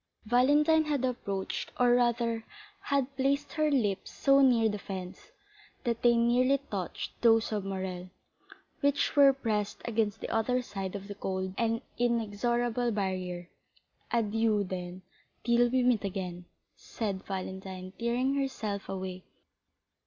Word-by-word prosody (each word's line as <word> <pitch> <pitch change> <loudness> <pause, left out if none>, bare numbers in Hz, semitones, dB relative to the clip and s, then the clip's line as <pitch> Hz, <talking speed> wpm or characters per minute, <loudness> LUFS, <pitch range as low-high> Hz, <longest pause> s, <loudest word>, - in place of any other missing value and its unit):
Valentine 295 +7 +4
had 285 -4 0
approached, 200 -6 -3
or 245 -1 +5
rather, 235 -2 +1 0.4
had 275 -1 0
placed 275 +2 0
her 310 -1 +2
lips 215 -9 0
so 275 0 +4
near 240 -4 +5
the 210 -1 -2
fence, 185 - -7 0.5
that 235 -2 -1
they 240 -1 +5
nearly 245 +3 +3
touched 190 -4 -4
those 225 -1 +4
of 210 -2 -1
Morrel, 185 -2 -4 0.7
which 285 -1 +1
were 280 -1 +8
pressed 215 -6 -2
against 220 -2 0
the - - -5
other 250 +3 +1
side 195 -3 -5
of 200 0 -6
the 205 - -5
cold 190 -2 -3
and 230 +1 0 0.2
inexorable 240 +1 0
barrier. 185 -4 -2 0.6
"Adieu, 225 -2 +2
then, 180 -1 -6 0.4
till 240 0 +4
we 255 +1 +2
meet 245 -4 +3
again," 180 -3 -4 0.3
said 200 -4 -4
Valentine, 190 -1 -6
tearing 245 +3 +1
herself 240 -8 -3
away. 185 -1 -5
225 Hz, 130 wpm, -30 LUFS, 195-250 Hz, 0.7 s, were